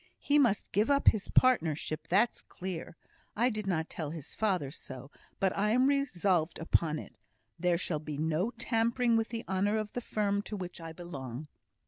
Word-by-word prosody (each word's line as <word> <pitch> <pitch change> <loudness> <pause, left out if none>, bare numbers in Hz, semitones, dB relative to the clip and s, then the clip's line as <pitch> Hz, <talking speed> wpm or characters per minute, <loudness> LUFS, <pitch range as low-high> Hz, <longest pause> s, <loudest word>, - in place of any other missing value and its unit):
He 295 +1 +3
must 235 -8 +2
give 210 +5 +2
up 280 0 +6
his 210 -3 -2
partnership, 160 - +2
that's 210 +6 +2
clear. 180 -3 -6 0.4
I 240 +4 +3
did 215 -2 -4
not 160 -4 0
tell 155 -3 -5
his 155 -2 -7
father 185 -10 0
so, 135 0 -9 0.3
but 190 -1 +1
I 205 +1 +1
am 250 +4 +4
resolved 190 - +1
upon 160 -1 +1
it. - - -9 0.4
There 175 0 +2
shall 165 -3 -2
be 150 -1 -6
no 160 +7 +1
tampering 235 0 +1
with 225 0 +1
the 230 -1 -5
honour 200 +3 +1
of 215 -1 -3
the 245 - -3
firm 205 -3 0
to 210 0 -6
which 180 -2 -7
I 165 0 -6
belong." 145 -5 -7
190 Hz, 180 wpm, -31 LUFS, 160-225 Hz, 0.4 s, up